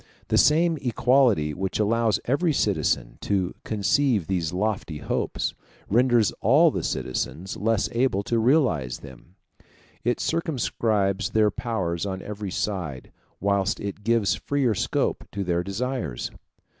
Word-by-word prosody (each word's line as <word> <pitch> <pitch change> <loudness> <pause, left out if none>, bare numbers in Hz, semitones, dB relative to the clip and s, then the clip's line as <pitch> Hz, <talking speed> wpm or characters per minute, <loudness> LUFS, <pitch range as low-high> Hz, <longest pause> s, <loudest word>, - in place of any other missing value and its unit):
The - - +2
same 165 +2 +4
equality 120 - +3
which 95 +3 -3
allows 110 +1 +2
every 155 +6 +1
citizen - - 0
to 95 -3 0
conceive 110 - +1
these 85 -4 -1
lofty 95 -4 -2
hopes, 75 - -2 0.4
renders 120 0 +4
all 150 - +5
the - - -2
citizens 85 +8 -3
less 110 0 +1
able 115 -5 +1
to 115 +3 0
realize 110 - +2
them: 90 - -14 0.7
it 120 +1 0
circumscribes 110 - 0
their 110 -1 +3
powers 100 -7 -2
on 95 -1 -4
every 105 -1 -5
side, 90 -9 -3 0.3
whilst 100 -1 +1
it 100 0 -6
gives 110 -5 +2
freer 135 -2 0
scope - - -1
to 100 - -2
their 85 -1 0
desires. 100 - -3
105 Hz, 130 wpm, -25 LUFS, 95-120 Hz, 0.7 s, all